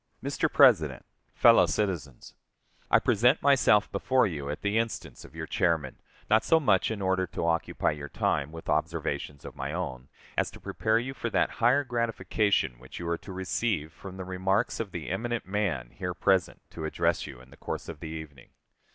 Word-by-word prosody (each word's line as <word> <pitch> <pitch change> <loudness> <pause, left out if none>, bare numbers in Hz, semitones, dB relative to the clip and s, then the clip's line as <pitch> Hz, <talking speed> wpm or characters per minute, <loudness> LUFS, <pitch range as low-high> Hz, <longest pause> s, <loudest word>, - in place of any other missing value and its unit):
Mr. - - 0
President - - +5 0.3
Fellow - - +6
Citizens: 85 - -3 0.6
I - - +6
present 120 +5 +3
myself 135 -7 +4
before 130 +6 +2
you 75 -8 -4
at 75 - -5
the 105 +2 +2
instance 115 0 -4
of - - -15
your - - -4
chairman, 75 -6 0 0.3
not 110 +1 +4
so 165 - +4
much 105 - +3
in 105 -3 -3
order 95 0 +1
to 85 - -4
occupy 85 0 0
your 75 -1 -7
time 70 +2 0
with 80 0 -10
observations 70 -2 -2
of - - -9
my 70 +2 -4
own, 65 -8 -4 0.3
as - - +1
to - - -13
prepare 110 0 0
you 125 +3 -3
for 120 - -3
that - - +1
higher 125 +5 +4
gratification 110 - 0
which 65 - -11
you 85 - -5
are 85 - 0
to 100 - -10
receive 95 -3 -2
from 95 +1 -10
the 95 - -6
remarks 95 +4 0
of 115 -3 -3
the 80 -5 -6
eminent 120 - -2
man 90 -12 -2
here 90 -2 -5
present 95 -1 +1
to 80 - -6
address 80 - 0
you 65 - -10
in 65 +1 -17
the - - -14
course - - -5
of 80 -3 -7
the 80 - -7
evening. 80 -5 -9
95 Hz, 190 wpm, -28 LUFS, 80-110 Hz, 0.6 s, Fellow